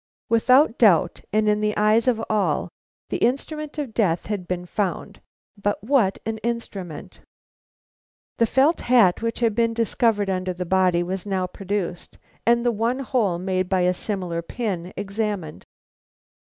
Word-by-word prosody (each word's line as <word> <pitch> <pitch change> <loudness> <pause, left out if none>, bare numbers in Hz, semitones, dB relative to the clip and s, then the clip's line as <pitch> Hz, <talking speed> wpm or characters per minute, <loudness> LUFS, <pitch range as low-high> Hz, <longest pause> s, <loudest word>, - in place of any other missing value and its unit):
Without 250 +2 +4
doubt, 180 -6 +4
and 215 +1 +2
in 210 0 +2
the 210 0 0
eyes 215 +3 +3
of 225 -3 +1
all, 215 -2 0 0.4
the - - 0
instrument 300 +5 -1
of 280 -7 -4
death 180 -7 +1
had 200 -4 -4
been 180 -1 -3
found. 190 +1 -3 0.3
But 205 -1 -2
what 225 -6 +2
an 220 0 -3
instrument! 210 -8 -5 1.2
The 230 - +4
felt 285 +8 +3
hat 230 -8 +4
which 230 +1 -2
had 230 -2 +2
been 230 0 +1
discovered 225 -2 +1
under 185 -1 -1
the 180 0 -5
body 180 -1 +2
was 185 +2 -4
now 190 -2 0
produced 185 -1 -4 0.3
and 235 +1 +3
the 240 - +3
one 230 +3 0
hole 225 -9 0
made 185 0 -1
by 190 -1 +2
a 180 0 +3
similar 180 -3 -3
pin 185 -2 -4
examined. 200 -5 -4
210 Hz, 155 wpm, -23 LUFS, 185-230 Hz, 1.2 s, Without